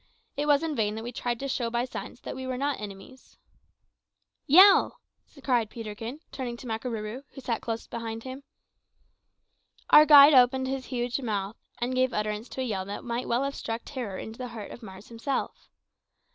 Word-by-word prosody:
It 295 +1 -2
was 290 +1 +4
in 320 -2 -2
vain 210 -3 0
that 220 - -6
we 240 - -5
tried 240 -1 -2
to 275 - -3
show 245 -3 -1
by 240 +1 -1
signs 250 -1 -8
that - - -6
we 260 0 -6
were 255 -1 -3
not 280 -2 -1
enemies. 205 +6 -11 1.1
"Yell!" 385 - +7 0.4
cried 240 -5 +1
Peterkin, 225 +5 -7
turning 245 -3 -5
to 255 - -11
Makarooroo, 225 0 -4
who - - -9
sat 235 -3 -2
close 225 -1 -4
behind 225 -1 -6
him. 260 +1 -7 1.5
Our 305 0 +9
guide 290 0 +10
opened 260 0 +5
his 265 -1 -3
huge 245 +1 -2
mouth, 210 -3 -3 0.2
and 245 +2 -2
gave 255 -1 +1
utterance 210 +2 -2
to 260 - -5
a - - -1
yell 195 -5 -2
that 200 +1 -6
might 240 +1 -3
well 240 +3 +1
have 275 0 -2
struck 225 -3 -5
terror 240 -9 -5
into 220 +2 -8
the 250 - -4
heart 220 -4 -8
of - - -10
Mars 190 -2 -11
himself. 235 +4 -4
245 Hz, 185 wpm, -27 LUFS, 225-265 Hz, 1.5 s, guide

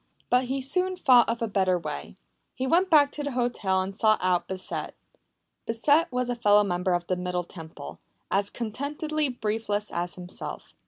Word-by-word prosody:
But 250 +1 +4
he 265 +2 -2
soon 365 +7 0
thought 255 -10 +5
of 230 0 -1
a - - 0
better 190 -3 +2
way. 70 - -6 0.4
He 255 - -2
went 350 +7 +3
back 290 -3 +6
to 295 - -5
the 285 -2 -3
hotel 235 -6 0
and 190 +1 -4
sought 215 0 +4
out 180 -1 +1
Bissett. 185 -1 -5 0.7
Bissett 285 +9 +2
was 250 0 -1
a 245 - -1
fellow 210 -3 +5
member 180 -1 0
of 175 0 -1
the 185 - 0
Middle 180 0 -2
Temple, 160 - -10 0.3
as 200 +1 +1
contentedly 290 +6 -2
briefless 210 -3 -2
as 175 0 -3
himself. 180 0 -7
220 Hz, 175 wpm, -27 LUFS, 185-265 Hz, 0.7 s, back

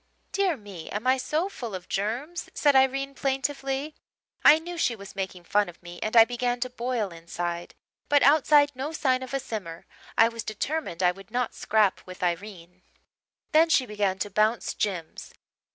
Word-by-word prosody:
"'Dear 385 -6 +1
me, 200 -7 -10
am 210 +4 -4
I 260 +1 +4
so 305 +7 -1
full 235 - -6
of 180 -1 -8
germs?' 240 - -3
said 290 -2 +3
Irene 270 +1 +3
plaintively. 275 +1 -2 0.5
I 305 - +9
knew 345 +2 -7
she 260 -8 +1
was 200 -2 -11
making 190 -2 -4
fun 205 +2 +1
of 175 - -15
me 175 0 -9
and 215 +2 0
I 225 - +10
began 245 0 -1
to 255 0 -2
boil 240 -5 -2
inside 170 +1 -5 0.3
but 290 -1 +5
outside 290 0 +5
no 275 +4 -4
sign 260 -5 +1
of 260 - -7
a 275 - 0
simmer. 195 -10 -6 0.3
I 225 - +7
was 230 0 -5
determined 215 - -3
I 180 - +5
would 195 +1 -14
not 245 +1 -1
scrap 210 -3 +2
with 185 +1 -8
Irene. 180 0 -4 0.7
"Then 325 +1 +5
she 265 -5 +4
began 205 -4 -1
to 205 +1 -3
bounce 215 +4 +1
Jims. 180 -6 -4
230 Hz, 180 wpm, -26 LUFS, 195-275 Hz, 0.7 s, I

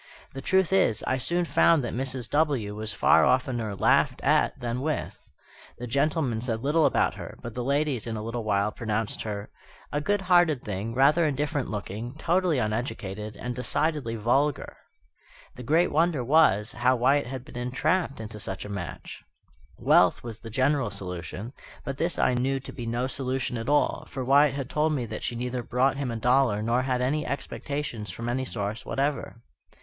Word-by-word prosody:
The 135 - -6
truth 190 +4 +2
is, 185 - +3
I 130 - 0
soon 175 +7 0
found 165 -2 +4
that 120 - -3
Mrs. 130 -1 -1
W. 140 -9 +1
was 110 0 -4
far - - +4
oftener 125 -4 +1
laughed - - +3
at - - +2
than 120 +1 -3
with. 155 +1 -4 0.5
The 125 - -6
gentlemen 140 -2 0
said 115 -2 -2
little 150 +2 +3
about - - +2
her; - - -9
but 120 - -6
the 125 - -3
ladies 140 -3 0
in 115 - -3
a 105 - -5
little 115 +1 -4
while 100 0 +1
pronounced 110 -1 -3
her 105 -1 -5 0.4
"a 145 - -1
good 205 +5 +1
hearted 175 -7 +3
thing, 105 +2 -4
rather 145 +6 +4
indifferent 145 -1 -1
looking, 110 +4 -5
totally 175 0 +1
uneducated, 105 -2 -3
and 125 0 -4
decidedly 130 -1 -1
vulgar." 135 +6 0 0.8
The - - -10
great 155 +8 +2
wonder 160 -4 +2
was, 120 -7 +4
how 125 +3 +2
Wyatt 135 +3 +2
had 130 0 -6
been - - -13
entrapped 135 +5 0
into 110 -1 -7
such 95 -1 -6
a - - -7
match. 100 -3 -7 0.5
Wealth - - +4
was 115 -2 -7
the 115 - -9
general 130 +1 +1
solution, 95 +4 -6 0.3
but 135 -1 -4
this 170 +3 0
I - - +3
knew 135 +2 0
to 135 - -9
be 120 -2 -6
no 120 +2 -1
solution 130 -1 -2
at 115 +2 -4
all; 145 0 +1
for 130 -1 -4
Wyatt 140 +1 +5
had 135 -2 -3
told 155 +2 +1
me 130 -5 -1
that 110 -1 -6
she 120 - -3
neither 125 +1 -3
brought 125 +3 +1
him 140 -3 -2
a 115 - -3
dollar 120 -2 +2
nor 120 +3 +2
had 130 -1 -1
any 150 +4 0
expectations 140 -6 -4
from 115 +5 -5
any 130 +2 -1
source 105 -2 -4
whatever. 140 -4 -2
125 Hz, 185 wpm, -27 LUFS, 115-145 Hz, 0.8 s, Wyatt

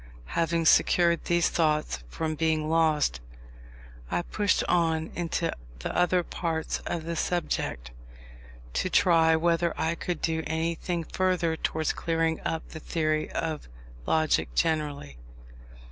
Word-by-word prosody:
Having 165 0 +1
secured 170 +1 +4
these 175 -1 +2
thoughts 155 - +1
from 155 - -2
being 155 -1 0
lost, 155 - +2 0.9
I 175 - 0
pushed 205 +2 +1
on 165 -2 +1
into 170 0 -1 0.2
the - - -5
other 180 0 +3
parts 165 -2 -2
of 170 -2 -2
the 170 +1 -3
subject, 155 - -2 0.8
to 185 - 0
try 165 -4 +4
whether 170 +1 +1
I 160 - +1
could 170 -1 -3
do 160 -1 0
anything 165 +2 -2
further 180 -1 0
towards 160 -1 -1
clearing 165 -1 0
up 160 - -3
the 160 - -8
theory 155 -1 -1
of 160 - -3 0.4
logic 155 -1 +1
generally. 150 - -1
165 Hz, 125 wpm, -27 LUFS, 155-170 Hz, 0.9 s, secured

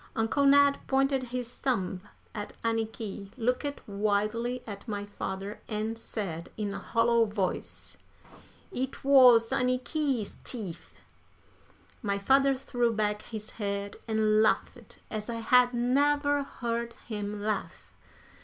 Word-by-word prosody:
Uncle 225 +5 +1
Ned 285 0 +6
pointed 270 -1 +2
his 245 0 -5
thumb 190 -8 -1 0.3
at 210 -2 -6
Anniky, 220 -3 -2
looked 250 +4 -1
wildly 215 +4 0
at 205 +1 -8
my 205 -2 -3
father, 200 0 -5
and 215 +1 -2
said, 195 -7 -5
in 205 -2 -2
a - - -4
hollow 230 0 +3
voice: 205 -4 -3 0.7
"It 265 -4 -4
wuz 250 -4 +7
Anniky's 255 -1 0
teef!" 195 -9 -6 1.1
My 200 -4 0
father 270 +6 +4
threw 245 -2 0
back 210 -1 0
his 215 -2 -7
head 200 -1 -3
and 215 -1 +3
laughed 215 - 0
as 215 +1 -4
I 235 - -2
had 245 +2 +4
never 285 +4 +2
heard 235 -3 -3
him 210 -2 -4
laugh. 215 0 -3
230 Hz, 120 wpm, -29 LUFS, 210-250 Hz, 1.1 s, wuz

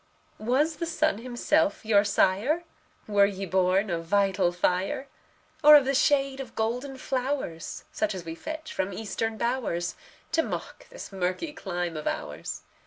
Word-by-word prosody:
Was 280 +8 +1
the 335 - -2
sun 310 -7 +1
himself 255 +4 +1
your 205 -2 +5
sire? 210 - +2 0.4
Were 200 -1 +5
ye 195 -1 -4
born 190 +2 +2
of 165 -1 -1
vital 195 -1 +2
fire? 185 +10 0 0.6
Or 300 +1 +11
of 285 -3 +7
the 275 - +1
shade 275 -1 +2
of 255 -4 -7
golden 250 +5 -2
flowers, 260 - -3
Such 215 -2 -1
as 180 -3 -7
we 165 - -5
fetch 315 - -6
from 190 +1 -2
Eastern 220 +2 -3
bowers, 235 -9 -1 0.4
To 325 - +3
mock - - -6
this - - -9
murky 190 - -2
clime 175 - -3
of 155 - -4
ours? - - -4
220 Hz, 155 wpm, -27 LUFS, 190-275 Hz, 0.6 s, Or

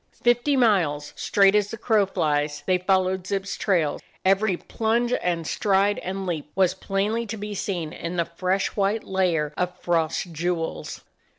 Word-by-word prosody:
Fifty 240 +4 +3
miles, 175 - +2
straight 195 -1 +3
as 210 -1 +2
the 225 - -6
crow 215 -3 +2
flies, 150 -5 -1
they 185 -1 +2
followed 185 0 +1
Zip's 195 0 -2
trail. 170 -8 +1 0.3
Every 195 0 +3
plunge 235 +5 0
and 170 -2 -1
stride 200 +3 +2
and 190 +1 -4
leap 160 -5 -3
was 185 -1 +3
plainly 210 +4 -1
to 220 +2 -5
be 210 0 -5
seen 175 -5 -3
in 170 +2 -5
the 170 -1 +1
fresh 185 +3 -1
white 205 +2 +1
layer 170 -6 0
of 180 0 -2
frost 165 0 0
jewels. 165 0 -3
190 Hz, 160 wpm, -24 LUFS, 170-205 Hz, 0.3 s, Fifty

